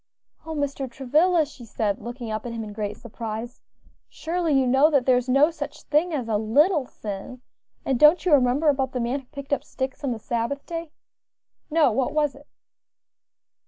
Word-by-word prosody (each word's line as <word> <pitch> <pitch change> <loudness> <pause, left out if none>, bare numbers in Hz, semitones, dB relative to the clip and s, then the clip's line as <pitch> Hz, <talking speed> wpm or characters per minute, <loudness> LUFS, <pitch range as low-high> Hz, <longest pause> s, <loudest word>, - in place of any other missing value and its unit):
"O 320 - -4
Mr. 280 -2 -2
Travilla!" 305 +7 +2
she 275 -4 -13
said, 210 -3 -2
looking 240 -1 -6
up 215 0 -3
at - - -5
him 225 -1 -4
in 210 -1 -8
great 210 -1 -4
surprise, 230 0 -7 0.5
"surely 335 0 -2
you 260 - +2
know 265 +5 +5
that 280 -5 +2
there 255 - +5
is 250 +1 -1
no 280 +5 +5
such 295 -2 -7
thing 310 +4 +1
as 265 -7 -2
a 220 -2 +1
little 285 - +3
sin; 210 +5 -7 0.4
and 265 -3 0
don't 305 +5 +6
you 360 - +2
remember 275 +3 +4
about 270 -2 0
the 250 - -2
man 245 +4 -1
who 270 - -17
picked 280 0 -5
up - - 0
sticks 265 +2 -5
on 275 - 0
the 235 - -2
Sabbath 235 +5 -3
day?" 335 -1 -5 0.8
"No; 310 -5 +4
what 250 +4 0
was 300 -2 +1
it?" 285 +1 -17
265 Hz, 195 wpm, -24 LUFS, 235-300 Hz, 0.8 s, don't